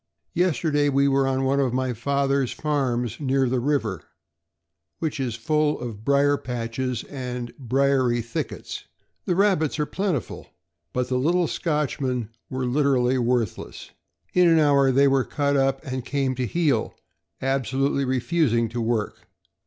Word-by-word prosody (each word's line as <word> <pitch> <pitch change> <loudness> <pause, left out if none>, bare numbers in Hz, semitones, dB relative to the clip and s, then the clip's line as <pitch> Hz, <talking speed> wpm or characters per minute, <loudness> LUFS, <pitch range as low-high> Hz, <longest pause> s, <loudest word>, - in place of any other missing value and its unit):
Yesterday 155 -4 +1
we 140 0 +3
were 135 -1 +2
on 135 0 0
one 135 +1 +2
of 130 -3 +1
my 130 -1 0
father's 140 +2 0
farms 125 -6 -1
near 135 -2 +1
the 125 +1 0
river, 120 - -1 1.0
which 155 -2 -3
is 125 -4 -2
full 150 +5 +1
of 115 -4 -7
brier 140 +2 +3
patches 125 0 -3
and 125 -3 -6
briery 130 -1 +2
thickets. 115 0 -5 0.4
The 180 - +1
rahbits 185 -7 +2
are 150 - +1
plentiful, 185 - -3 0.4
but 125 0 -1
the 125 -1 +1
little 175 +6 +2
Scotchmen 135 - -1 0.2
were 130 0 -2
literally 130 -1 +2
worthless. 120 -4 -2 0.4
In 180 -1 +5
an 165 -1 +5
hour 140 -3 +4
they 140 +2 +4
were 135 -1 +3
cut 145 +1 0
up 135 +2 +1
and 130 -2 -4
came 135 0 -1
to 125 -1 -2
heel, 145 -6 0 0.4
absolutely 135 +1 0
refusing 130 -2 +1
to 120 +1 -3
work. 115 -2 -2
135 Hz, 145 wpm, -24 LUFS, 125-145 Hz, 1.0 s, In